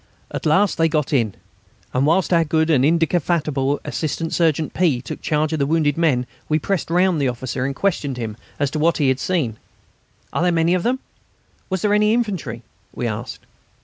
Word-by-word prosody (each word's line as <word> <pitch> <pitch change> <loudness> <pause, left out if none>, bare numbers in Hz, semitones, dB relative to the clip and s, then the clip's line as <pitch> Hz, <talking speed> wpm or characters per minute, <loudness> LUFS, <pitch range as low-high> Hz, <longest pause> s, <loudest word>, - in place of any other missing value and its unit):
At - - -3
last 190 +5 +3
they 165 0 +4
got 155 -2 -1
in, 115 -7 +1 0.6
and 130 +3 +2
whilst 180 +3 +2
our 165 -1 +5
good 160 +1 +1
and 135 -4 +4
indefatigable 155 -3 +1
Assistant 160 +1 -3
Surgeon 160 -2 +1
P. 160 -8 +2
took 120 - -7
charge 155 +1 0
of 160 - -1
the 140 - +1
wounded 150 -2 +2
men 145 -7 +2 0.2
we 155 - +3
pressed 185 +3 -2
round 180 -2 +2
the 135 - +2
officer 125 +1 -3
and 140 - -4
questioned 145 -9 -1
him 110 -3 -4 0.2
as 140 -1 0
to 155 - -2
what 165 +2 +2
he 145 -4 +2
had 130 0 +1
seen. 140 -13 -1 0.8
"Are - - 0
there 180 0 +3
many 165 +1 +2
of 185 - +1
them?" 255 +6 0 0.7
"Was 190 -2 -2
there 205 -1 +3
any 210 +1 +4
infantry?" 185 - -2 0.3
we 125 - -3
asked. 115 +2 -5
155 Hz, 195 wpm, -21 LUFS, 135-170 Hz, 0.8 s, our